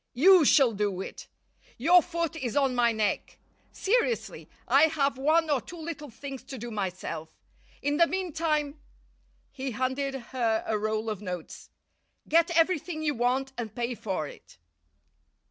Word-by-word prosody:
You 350 Hz, +4 st, +7 dB
shall 270 Hz, -4 st, +5 dB
do 200 Hz, -2 st, -1 dB
it. -, -, -8 dB, 0.5 s
Your 345 Hz, +8 st, +6 dB
foot 335 Hz, -1 st, -3 dB
is 265 Hz, -4 st, -3 dB
on 270 Hz, -2 st, +3 dB
my 240 Hz, -1 st, +3 dB
neck. 220 Hz, -2 st, -1 dB, 0.3 s
Seriously, 475 Hz, +3 st, -1 dB, 0.2 s
I 280 Hz, +3 st, +6 dB
have 285 Hz, -3 st, 0 dB
one 310 Hz, +5 st, +2 dB
or 275 Hz, -4 st, +2 dB
two 345 Hz, -, -10 dB
little 315 Hz, -3 st, -6 dB
things 270 Hz, +3 st, -8 dB
to 265 Hz, 0 st, -7 dB
do 240 Hz, +1 st, -6 dB
myself. 185 Hz, -6 st, -4 dB, 0.5 s
In 290 Hz, +1 st, +1 dB
the 335 Hz, -, +5 dB
meantime" 315 Hz, -5 st, -1 dB, 0.7 s
he 270 Hz, -1 st, -4 dB
handed 260 Hz, +3 st, -2 dB
her 235 Hz, -3 st, -1 dB
a 220 Hz, -, 0 dB
roll 215 Hz, +1 st, -1 dB
of 210 Hz, -3 st, -3 dB
notes 180 Hz, -5 st, -7 dB, 0.6 s
"get 335 Hz, +2 st, +4 dB
everything 330 Hz, -1 st, +1 dB
you 300 Hz, -1 st, +1 dB
want 260 Hz, +2 st, 0 dB
and 220 Hz, -3 st, -5 dB
pay 240 Hz, 0 st, -2 dB
for 190 Hz, -9 st, -3 dB
it." -, -, -14 dB
270 Hz, 150 wpm, -28 LUFS, 230-315 Hz, 0.7 s, You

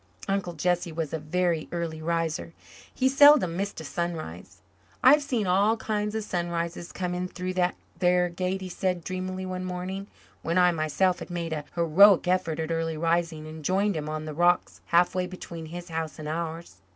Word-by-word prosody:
Uncle 195 Hz, -3 st, -1 dB
Jesse 175 Hz, +1 st, 0 dB
was 160 Hz, -2 st, -4 dB
a 160 Hz, -, -1 dB
very 165 Hz, +1 st, -1 dB
early 165 Hz, -2 st, -3 dB
riser. 165 Hz, 0 st, -2 dB, 0.4 s
He 260 Hz, -, +1 dB
seldom 275 Hz, -, +6 dB
missed 200 Hz, +2 st, -3 dB
a -, -, -7 dB
sunrise. 95 Hz, -, -5 dB, 0.4 s
"I've 290 Hz, +4 st, +7 dB
seen 250 Hz, -7 st, -1 dB
all 200 Hz, +5 st, +3 dB
kinds 210 Hz, -1 st, -2 dB
of 220 Hz, -, -1 dB
sunrises 170 Hz, -2 st, -3 dB
come 180 Hz, -2 st, -3 dB
in 180 Hz, +1 st, -2 dB
through 185 Hz, 0 st, -4 dB
that 180 Hz, -1 st, +1 dB, 0.2 s
there 180 Hz, -1 st, +3 dB
Gate," 185 Hz, +2 st, -2 dB
he 190 Hz, -, -5 dB
said 180 Hz, -1 st, -1 dB
dreamily 185 Hz, +1 st, -4 dB
one 185 Hz, 0 st, -4 dB
morning 185 Hz, +2 st, -4 dB, 0.3 s
when 170 Hz, +2 st, -1 dB
I 180 Hz, -1 st, +6 dB
myself 170 Hz, +3 st, +1 dB
had -, -, -8 dB
made 170 Hz, -2 st, -3 dB
a 150 Hz, -2 st, -4 dB
heroic 180 Hz, +3 st, +6 dB
effort 180 Hz, -3 st, +1 dB
at 160 Hz, +1 st, -2 dB
early 165 Hz, -1 st, -1 dB
rising 165 Hz, -1 st, 0 dB
and 155 Hz, 0 st, -9 dB
joined 195 Hz, +4 st, +1 dB
him 155 Hz, -1 st, -3 dB
on 155 Hz, 0 st, -4 dB
the 155 Hz, -, -5 dB
rocks 175 Hz, +3 st, +2 dB
halfway 180 Hz, +1 st, +2 dB
between 170 Hz, -3 st, -8 dB
his 175 Hz, +2 st, -8 dB
house 160 Hz, -1 st, -4 dB
and 155 Hz, -, -7 dB
ours. 165 Hz, -, -4 dB
175 Hz, 185 wpm, -27 LUFS, 165-185 Hz, 0.4 s, I've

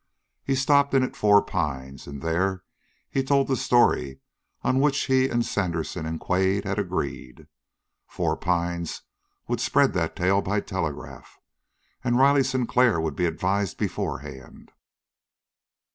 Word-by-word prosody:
He 135 Hz, -, 0 dB
stopped 140 Hz, +1 st, +3 dB
in 130 Hz, -, +4 dB
at 130 Hz, -, -3 dB
Four 105 Hz, -1 st, +5 dB
Pines, 70 Hz, -7 st, -4 dB
and 70 Hz, 0 st, -8 dB
there 90 Hz, +3 st, 0 dB, 0.4 s
he 135 Hz, -, -1 dB
told 135 Hz, +1 st, +2 dB
the 135 Hz, -, +1 dB
story 115 Hz, -, +2 dB, 0.4 s
on 130 Hz, -, +2 dB
which 140 Hz, -1 st, +2 dB
he 130 Hz, 0 st, +2 dB
and 120 Hz, 0 st, 0 dB
Sandersen 85 Hz, -3 st, -2 dB
and 80 Hz, 0 st, -4 dB
Quade 95 Hz, +2 st, +1 dB
had 100 Hz, 0 st, -2 dB
agreed. 85 Hz, -9 st, -4 dB, 0.6 s
Four -, -, -1 dB
Pines 85 Hz, -1 st, -2 dB, 0.4 s
would -, -, -2 dB
spread -, -, +3 dB
that -, -, -1 dB
tale 95 Hz, +2 st, +2 dB
by 100 Hz, +2 st, -1 dB
telegraph, 80 Hz, -8 st, -6 dB, 0.7 s
and 120 Hz, 0 st, +1 dB
Riley 140 Hz, +1 st, +5 dB
Sinclair 125 Hz, -5 st, +2 dB
would 80 Hz, -1 st, -2 dB
be 90 Hz, -2 st, +1 dB
advised 95 Hz, +4 st, -1 dB
beforehand. 65 Hz, -1 st, -5 dB
95 Hz, 135 wpm, -25 LUFS, 85-130 Hz, 0.7 s, Four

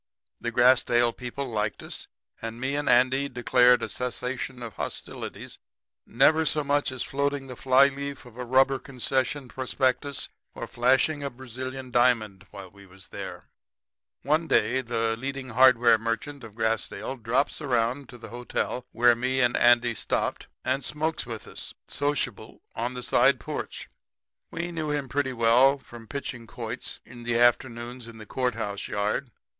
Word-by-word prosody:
The 120 Hz, -, -3 dB
Grassdale 120 Hz, -1 st, +4 dB
people 125 Hz, +2 st, -5 dB
liked 105 Hz, -3 st, -2 dB
us, -, -, -5 dB, 0.3 s
and 115 Hz, +1 st, -5 dB
me 130 Hz, +2 st, -1 dB
and 145 Hz, 0 st, -1 dB
Andy 130 Hz, +3 st, +4 dB
declared 125 Hz, 0 st, +4 dB
a -, -, -1 dB
cessation 125 Hz, 0 st, -4 dB
of 115 Hz, -3 st, -7 dB
hostilities, -, -, -6 dB, 0.5 s
never 155 Hz, +6 st, +4 dB
so 150 Hz, -1 st, +1 dB
much 145 Hz, -1 st, +1 dB
as 130 Hz, -, -3 dB
floating 140 Hz, 0 st, -1 dB
the 130 Hz, -1 st, -8 dB
fly 130 Hz, +2 st, +5 dB
leaf 140 Hz, 0 st, -6 dB
of 120 Hz, -2 st, -14 dB
a 125 Hz, -, -5 dB
rubber 130 Hz, +2 st, +3 dB
concession 130 Hz, +1 st, -2 dB
prospectus 130 Hz, +2 st, -1 dB, 0.3 s
or -, -, -5 dB
flashing 130 Hz, +5 st, +2 dB
a 140 Hz, -, -2 dB
Brazilian 130 Hz, +1 st, -7 dB
diamond 110 Hz, -6 st, +2 dB
while 95 Hz, -2 st, -10 dB
we 100 Hz, 0 st, -16 dB
was 95 Hz, +1 st, -14 dB
there. -, -, -7 dB, 0.8 s
"One 155 Hz, +4 st, +1 dB
day 130 Hz, -1 st, +3 dB
the 115 Hz, -2 st, -1 dB
leading 135 Hz, +2 st, -5 dB
hardware 120 Hz, -2 st, +6 dB
merchant 115 Hz, +5 st, -3 dB
of 110 Hz, -2 st, -11 dB
Grassdale 110 Hz, +2 st, -2 dB
drops 125 Hz, +8 st, 0 dB
around 125 Hz, 0 st, 0 dB
to 125 Hz, -, -11 dB
the 120 Hz, -, -10 dB
hotel 125 Hz, +1 st, -3 dB
where 120 Hz, 0 st, +5 dB
me 130 Hz, +3 st, -1 dB
and 120 Hz, -1 st, +3 dB
Andy 120 Hz, 0 st, +5 dB
stopped, -, -, -2 dB, 0.2 s
and 130 Hz, +2 st, 0 dB
smokes 150 Hz, 0 st, -1 dB
with 115 Hz, -3 st, -7 dB
us, -, -, -7 dB
sociable, 130 Hz, -6 st, -2 dB
on 120 Hz, +2 st, -2 dB
the 125 Hz, -, -5 dB
side -, -, +4 dB
porch. -, -, -5 dB, 0.6 s
We 170 Hz, +1 st, -4 dB
knew 160 Hz, -3 st, -3 dB
him 145 Hz, -2 st, -1 dB
pretty 135 Hz, 0 st, -1 dB
well 125 Hz, +4 st, +5 dB
from 120 Hz, -4 st, -13 dB
pitching 120 Hz, -2 st, -6 dB
quoits 115 Hz, +2 st, -5 dB
in 120 Hz, +1 st, -12 dB
the 120 Hz, 0 st, 0 dB
afternoons 120 Hz, 0 st, +1 dB
in 115 Hz, -1 st, -11 dB
the 110 Hz, -, -10 dB
court 125 Hz, +2 st, -1 dB
house 100 Hz, -3 st, -4 dB
yard. 105 Hz, +6 st, -1 dB
125 Hz, 160 wpm, -27 LUFS, 115-135 Hz, 0.8 s, hardware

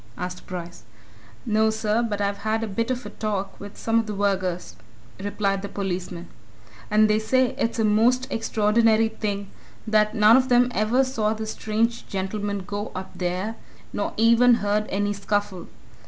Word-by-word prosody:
asked 180 Hz, 0 st, -6 dB
Bryce. 175 Hz, -2 st, -7 dB, 0.6 s
"No, 220 Hz, -1 st, +3 dB
sir. 220 Hz, +1 st, 0 dB
But 210 Hz, -3 st, -2 dB
I've 200 Hz, 0 st, -1 dB
had 220 Hz, +1 st, -1 dB
a -, -, -2 dB
bit 230 Hz, +4 st, -2 dB
of 255 Hz, -1 st, -2 dB
a -, -, -7 dB
talk 205 Hz, -3 st, -3 dB
with 205 Hz, 0 st, -10 dB
some 225 Hz, 0 st, +1 dB
of 225 Hz, -, -2 dB
the 210 Hz, -, -4 dB
vergers," 190 Hz, -3 st, -1 dB, 0.5 s
replied 200 Hz, -1 st, -1 dB
the 200 Hz, -, -5 dB
policeman, 180 Hz, -3 st, -4 dB, 0.6 s
"and 215 Hz, +1 st, +5 dB
they 215 Hz, 0 st, +2 dB
say 250 Hz, +3 st, +2 dB
it's 230 Hz, +1 st, -1 dB
a 225 Hz, -, +2 dB
most 235 Hz, +5 st, +3 dB
extraordinary 225 Hz, 0 st, +2 dB
thing 205 Hz, -3 st, -4 dB, 0.3 s
that 215 Hz, -1 st, +2 dB
none 215 Hz, +3 st, +7 dB
of 260 Hz, 0 st, +1 dB
them 245 Hz, 0 st, +4 dB
ever 220 Hz, +6 st, +2 dB
saw 225 Hz, -5 st, 0 dB
this 220 Hz, 0 st, -4 dB
strange 230 Hz, +2 st, -1 dB
gentleman 200 Hz, +1 st, -3 dB
go 205 Hz, +1 st, -4 dB
up 185 Hz, +1 st, -6 dB
there, 185 Hz, +5 st, -3 dB, 0.4 s
nor -, -, -2 dB
even 235 Hz, +2 st, +6 dB
heard 210 Hz, 0 st, 0 dB
any 205 Hz, +1 st, 0 dB
scuffle. 205 Hz, -2 st, -2 dB
215 Hz, 170 wpm, -24 LUFS, 200-225 Hz, 0.6 s, none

